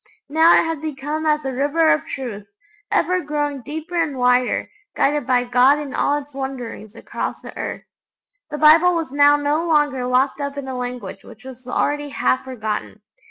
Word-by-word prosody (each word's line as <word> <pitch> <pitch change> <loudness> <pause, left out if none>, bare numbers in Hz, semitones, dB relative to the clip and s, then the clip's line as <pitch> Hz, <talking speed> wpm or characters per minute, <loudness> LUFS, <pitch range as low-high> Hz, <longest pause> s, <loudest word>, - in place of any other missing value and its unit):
Now 320 +3 +5
it - - +1
had 325 -2 -3
become 305 +1 -4
as 300 -1 +1
a 265 - -2
river 295 +5 +2
of 305 - 0
truth, 215 -7 -6 0.4
ever 365 0 +1
growing 290 -2 -2
deeper 315 +6 -7
and 325 -5 0
wider, 250 0 +2 0.3
guided 290 -2 +1
by 250 -1 +3
God 250 +3 +4
in 290 -2 -6
all 290 - +1
its 290 0 -9
wanderings 250 -5 -6
across - - -5
the - - -11
earth. - - -5 0.7
The 300 - -5
Bible 325 +4 +6
was 325 -5 -3
now 290 +1 +5
no 290 +2 0
longer 295 -6 +1
locked 260 +3 +1
up 280 0 -4
in 280 -1 -5
a 260 - -4
language 245 -6 -6
which 220 +3 -15
was 255 -1 -11
already 290 +3 -1
half 255 -2 0
forgotten. 220 -5 -5
285 Hz, 180 wpm, -21 LUFS, 255-300 Hz, 0.7 s, Bible